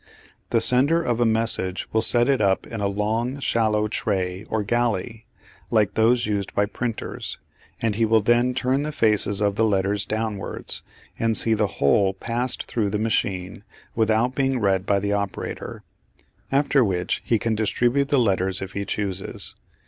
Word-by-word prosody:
The - - +2
sender 140 +7 +5
of 120 -8 -1
a 120 - +3
message 110 -4 0
will 110 - +3
set 120 +1 +4
it 135 -4 +2
up 95 -2 +1
in 115 -2 -6
a 100 - +1
long 110 +6 -1
shallow 110 -5 +1
tray 95 -2 -2
or 110 -1 -2
"galley" 115 0 -1 0.4
like 110 -4 +2
those 115 +2 +3
used 100 -2 -3
by 100 - +3
printers, 115 +2 -5 0.5
and 110 -2 +1
he 115 +3 0
will 110 0 +3
then 120 +3 +2
turn 130 +1 +1
the 150 +1 -3
faces 105 -6 +1
of 100 -1 +1
the 115 - +3
letters 100 -1 0
downwards 110 -2 -3 0.4
and 115 -1 +1
see 115 - +3
the 105 -1 +1
whole 95 +7 +3
passed 120 +5 -2
through 110 -4 -2
the 105 - -1
machine 100 -3 -2 0.3
without 110 +2 +1
being 135 -1 0
read 95 -3 +1
by 100 -1 +3
the 100 +1 -1
operator; 100 -2 -4 0.7
after 140 -1 +3
which 90 -4 -1
he 115 - +2
can 115 +1 -1
distribute 120 +5 +1
the 145 - +3
letters 95 -5 +1
if 95 0 -6
he 100 0 -3
chooses. 100 -2 -4
110 Hz, 170 wpm, -23 LUFS, 100-120 Hz, 0.7 s, sender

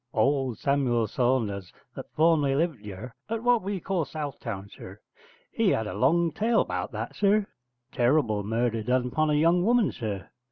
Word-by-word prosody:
Old 130 0 +1
Samuel 130 -5 +1
Saunders, 110 -6 -1 0.2
that - - -8
formerly 155 -4 +3
lived 160 -3 0
yurr 105 +4 -8 0.2
at 225 0 -3
what 245 -2 +3
we 195 0 -3
call 180 -1 -1
South 145 0 -6
town, 100 -5 -6
sir, - - -12 0.5
he - - +2
had 110 - +1
a 105 - -5
long 170 +5 +2
tale 225 +2 +1
'bout - - -4
that, - - -5
sir: 205 0 +3 0.5
terrible 120 -4 +2
murder 115 +2 -1
done 125 +2 0
'pon 155 +2 +1
a 150 - +2
young 170 +4 +3
woman, 235 0 +3
sir. 105 -5 -5
135 Hz, 170 wpm, -27 LUFS, 115-170 Hz, 0.5 s, formerly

